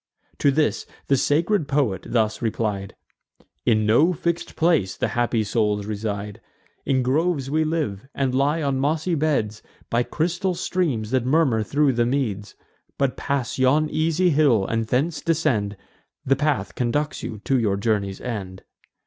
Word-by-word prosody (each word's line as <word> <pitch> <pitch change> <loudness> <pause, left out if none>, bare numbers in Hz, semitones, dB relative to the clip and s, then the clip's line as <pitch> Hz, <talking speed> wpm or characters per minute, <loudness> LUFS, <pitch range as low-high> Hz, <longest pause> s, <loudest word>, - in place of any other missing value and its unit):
To 145 - +4
this 150 +2 0 0.2
the 140 - +5
sacred 160 +6 +1
poet 135 -11 0
thus 110 -2 0
replied: 105 -4 -2 0.7
"In 110 -1 +3
no 145 +12 +4
fix'd 170 +1 -3
place 160 - +2
the - - 0
happy 120 -2 0
souls 105 -1 0
reside. 105 -1 -4 0.5
In 130 -2 +2
groves 140 +1 0
we 155 +1 +2
live, 150 -9 -2
and 135 -2 0
lie 145 +4 +1
on 135 -2 0
mossy 155 +5 0
beds, 140 -9 0 0.3
By 115 - +3
crystal 175 +7 -1
streams, 140 - -1
that 130 -2 +2
murmur 130 -4 +2
thro' 140 +6 +2
the 120 -1 +1
meads: 110 -7 -2 0.4
But 135 -2 0
pass 140 -3 -2
yon 145 +4 +3
easy 165 +3 +2
hill, 140 -9 +3
and 115 +1 -1
thence 145 +8 0
descend; 125 -12 0 0.5
The 135 - +3
path 145 -7 -1
conducts 145 +5 -1
you 110 - -5
to 135 -2 +2
your 100 -4 +1
journey's 100 -2 -1
end." 95 -6 -6
130 Hz, 150 wpm, -23 LUFS, 110-155 Hz, 0.7 s, the